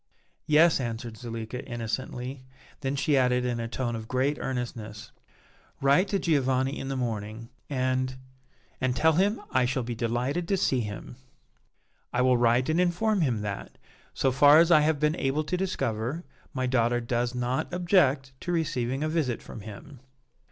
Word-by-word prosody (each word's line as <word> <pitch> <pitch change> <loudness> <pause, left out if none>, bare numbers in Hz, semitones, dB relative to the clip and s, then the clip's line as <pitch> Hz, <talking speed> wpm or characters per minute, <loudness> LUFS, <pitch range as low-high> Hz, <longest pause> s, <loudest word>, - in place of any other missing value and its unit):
"Yes," 155 +2 +5
answered 115 -2 -4
Zuleika, 115 +2 -6
innocently; 125 +2 -5 0.4
then 135 +1 -2
she 140 +1 +1
added 125 -1 +2
in 120 -1 -1
a 115 - -3
tone 120 0 -3
of 110 -1 -6
great 130 +4 0
earnestness: 115 -5 -5 0.7
"Write 140 +8 +4
to 200 - 0
Giovanni 135 -5 +1
in 135 - -5
the 135 - -2
morning, 115 -1 -4 0.2
and 130 -1 0 0.7
and 130 -1 +1
tell 160 +4 +4
him 200 +7 +2
I 130 -1 +3
shall 130 +1 -1
be 120 +1 -4
delighted 125 +8 -1
to 195 - +1
see 130 -7 +1
him." 105 +2 -6 0.9
"I 125 - +1
will 130 0 +4
write 120 +1 +3
and 160 +3 +2
inform 190 +3 +1
him 120 -8 +1
that, 100 -1 -6 0.3
so 135 - +1
far 145 +3 +7
as 165 +1 +5
I 155 - +8
have 150 -1 +1
been 150 +1 +2
able 135 +3 0
to 165 +4 -2
discover, 135 - -2 0.3
my 130 -2 -2
daughter 120 -1 +2
does 120 +1 -1
not 125 +4 -1
object 170 -7 +2
to 175 - -4
receiving 135 -5 -1
a - - 0
visit 155 -7 0
from 110 - -9
him." 115 +7 -10
130 Hz, 165 wpm, -27 LUFS, 120-150 Hz, 0.9 s, I